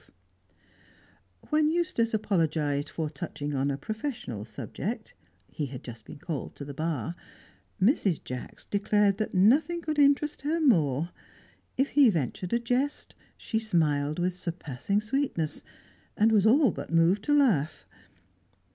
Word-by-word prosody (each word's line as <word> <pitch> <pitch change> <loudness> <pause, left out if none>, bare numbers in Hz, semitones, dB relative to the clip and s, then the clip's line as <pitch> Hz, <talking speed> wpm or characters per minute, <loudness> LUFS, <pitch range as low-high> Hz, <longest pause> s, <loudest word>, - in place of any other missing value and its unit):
When 305 0 +4
Eustace 315 -9 0
apologised 155 -8 0
for 160 -2 -3
touching 145 0 -5
on 135 +1 0
a 140 - -1
professional 215 - -5
subject 110 - -5 0.4
(he 150 - -3
had 130 -1 -8
just 115 -3 -9
been - - -10
called 150 -1 -5
to 140 - -7
the 140 - -7
Bar), 160 +2 -2 0.7
Mrs. 195 - +2
Jacks 125 -1 -7
declared 205 0 +2
that 215 - -2
nothing 280 - +4
could 305 -1 -1
interest 285 +1 +3
her 310 +4 0
more. 165 - +2 0.7
If 270 +2 +2
he 285 -4 +6
ventured 175 - -2
a - - +4
jest, 250 +5 -1 0.2
she 220 - -2
smiled 155 -8 +1
with 180 +1 0
surpassing 180 +1 -2
sweetness, 215 - -2 0.5
and 220 +2 +4
was 215 -1 +4
all 265 0 +5
but - - -7
moved 165 +4 +4
to 295 0 +4
laugh. 195 - +2
190 Hz, 140 wpm, -28 LUFS, 150-245 Hz, 0.7 s, he